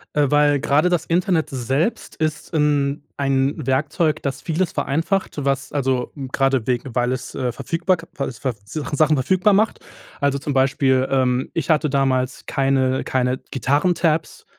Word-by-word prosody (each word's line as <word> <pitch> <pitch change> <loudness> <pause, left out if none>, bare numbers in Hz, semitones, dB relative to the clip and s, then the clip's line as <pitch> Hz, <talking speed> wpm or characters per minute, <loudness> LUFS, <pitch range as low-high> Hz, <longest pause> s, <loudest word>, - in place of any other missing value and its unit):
Äh, 145 -2 +2
weil 145 -1 +4
gerade 150 +6 +2
das 175 -3 0
Internet 175 -1 +1
selbst 135 - -1
ist 155 -1 -3
in 145 -2 +1
ein 135 0 +1
Werkzeug, 150 +4 0
das 140 -1 -3
vieles 170 +2 -1
vereinfacht, 160 +1 -1
was 140 0 -1
also, 130 -3 -1 0.2
gerade 135 -4 +1
wegen, 125 0 -2
weil 125 0 +1
es, 130 - -5
äh, 125 -2 -1
verfügbark 165 +6 -1
weil 140 - -2
es 120 - -11
ver 130 -3 -1
Sach 145 +8 -5
Sachen 155 +1 +3
verfügbar 190 +9 +3
macht. 215 +2 +2 0.4
Also, 140 -1 +1
zum 140 +1 -3
Beispiel, 130 -1 +2
ähm, 130 -1 +1
ich 165 -1 -3
hatte 155 -1 +3
damals 135 -2 0
keine 135 -1 +1
keine 130 0 0
Gitarren 145 +6 +1
Tabs, 165 -2 -1
140 Hz, 160 wpm, -21 LUFS, 130-155 Hz, 0.4 s, weil